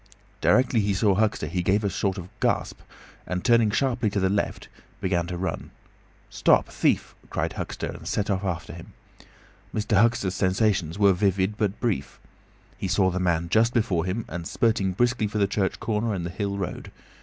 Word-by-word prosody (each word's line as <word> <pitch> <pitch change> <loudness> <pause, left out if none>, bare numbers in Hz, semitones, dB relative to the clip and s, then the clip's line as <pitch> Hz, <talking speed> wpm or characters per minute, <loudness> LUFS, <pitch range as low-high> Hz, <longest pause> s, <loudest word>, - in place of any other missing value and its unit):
Directly 125 -2 +3
he 100 -2 +1
saw 100 0 +3
Huxter 105 +2 +1
he 90 +1 -2
gave 100 +4 +1
a 100 - +1
sort 95 +1 -1
of 90 -2 -6
gasp, - - 0 0.5
and 90 0 -3
turning 115 -3 +5
sharply 120 0 +1
to 100 - -1
the 95 0 +1
left, 100 - -2 0.3
began 85 -2 0
to 90 0 -4
run. 95 +1 -4 0.6
"Stop, - - +3
thief!" - - 0 0.2
cried - - -2
Huxter, - - -4
and - - -10
set 105 0 -1
off 95 0 -1
after 85 -5 -3
him. 85 +1 -11 0.8
Mr. 105 -1 +2
Huxter's 115 -5 +2
sensations 95 -3 +1
were 100 -2 +5
vivid 95 +1 +1
but 105 -1 -1
brief. 100 - -2 0.6
He - - -2
saw 95 0 +2
the 90 - -2
man 85 -2 +1
just 115 +5 +3
before 95 -8 +1
him 95 +5 -2
and 85 0 -5
spurting 110 -6 +1
briskly 120 +1 +1
for 105 - -4
the 100 - +3
church 100 -1 -1
corner 110 -1 -1
and 85 -2 -3
the 85 - -4
hill 100 +1 -3
road. 95 -3 -5
100 Hz, 185 wpm, -25 LUFS, 90-110 Hz, 0.8 s, turning